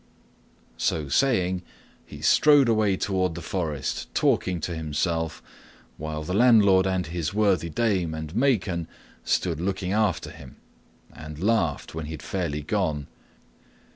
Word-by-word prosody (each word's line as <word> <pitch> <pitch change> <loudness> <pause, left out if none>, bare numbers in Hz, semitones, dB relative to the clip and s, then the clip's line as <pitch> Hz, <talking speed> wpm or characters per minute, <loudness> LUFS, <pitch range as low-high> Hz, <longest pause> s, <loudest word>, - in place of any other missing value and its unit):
So 75 -3 -1
saying, 95 - +2 0.4
he 75 - -12
strode 145 - +5
away 110 -4 +2
toward 95 -4 -1
the 85 - -6
forest, 80 -7 -3
talking 90 -2 +1
to 85 +2 -3
himself, 80 +1 -2 0.5
while 75 0 -5
the 90 - -4
landlord 100 -4 +5
and 95 -2 0
his 85 +1 -4
worthy 100 -5 +2
dame 95 -5 0
and 80 0 -6
Maken 100 - +1 0.4
stood 85 -3 0
looking 95 0 -2
after 105 -5 0
him, - - -13 0.6
and 75 -1 -9
laughed 90 -5 0
when 80 -1 -5
he 80 - -6
had 80 - -8
fairly 80 -6 -3
gone. 80 -5 -1
90 Hz, 135 wpm, -25 LUFS, 80-100 Hz, 0.6 s, strode